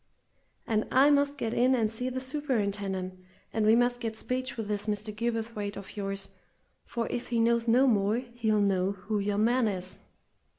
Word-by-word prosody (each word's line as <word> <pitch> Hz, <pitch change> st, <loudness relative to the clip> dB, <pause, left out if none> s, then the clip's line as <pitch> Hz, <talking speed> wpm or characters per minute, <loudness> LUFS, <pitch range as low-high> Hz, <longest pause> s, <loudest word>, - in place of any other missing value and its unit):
And 215 Hz, -1 st, 0 dB
I 275 Hz, +3 st, +6 dB
must 285 Hz, 0 st, +2 dB
get 230 Hz, -4 st, -2 dB
in 255 Hz, +2 st, +4 dB
and 225 Hz, -3 st, +2 dB
see 225 Hz, +4 st, -3 dB
the 260 Hz, 0 st, -3 dB
superintendent, 200 Hz, -9 st, -2 dB, 0.3 s
and 220 Hz, -1 st, +1 dB
we 220 Hz, -, +7 dB
must 245 Hz, +1 st, +2 dB
get 225 Hz, -2 st, -4 dB
speech 255 Hz, +1 st, -2 dB
with 220 Hz, -2 st, -3 dB
this 210 Hz, 0 st, -1 dB
Mr. 210 Hz, 0 st, -2 dB
Gilverthwaite 225 Hz, -3 st, -3 dB
of 200 Hz, -, -9 dB
yours 195 Hz, -1 st, -4 dB, 0.6 s
for, 235 Hz, -1 st, -3 dB
if 240 Hz, -, -3 dB
he 235 Hz, -1 st, 0 dB
knows 235 Hz, +1 st, +2 dB
no 245 Hz, +4 st, +5 dB
more, 210 Hz, -4 st, +3 dB
he'll 235 Hz, -4 st, 0 dB
know 195 Hz, -1 st, +2 dB
who 205 Hz, +2 st, -3 dB
yon 205 Hz, +1 st, 0 dB
man 240 Hz, +1 st, +3 dB
is!" 185 Hz, -2 st, -3 dB
225 Hz, 180 wpm, -29 LUFS, 205-245 Hz, 0.6 s, we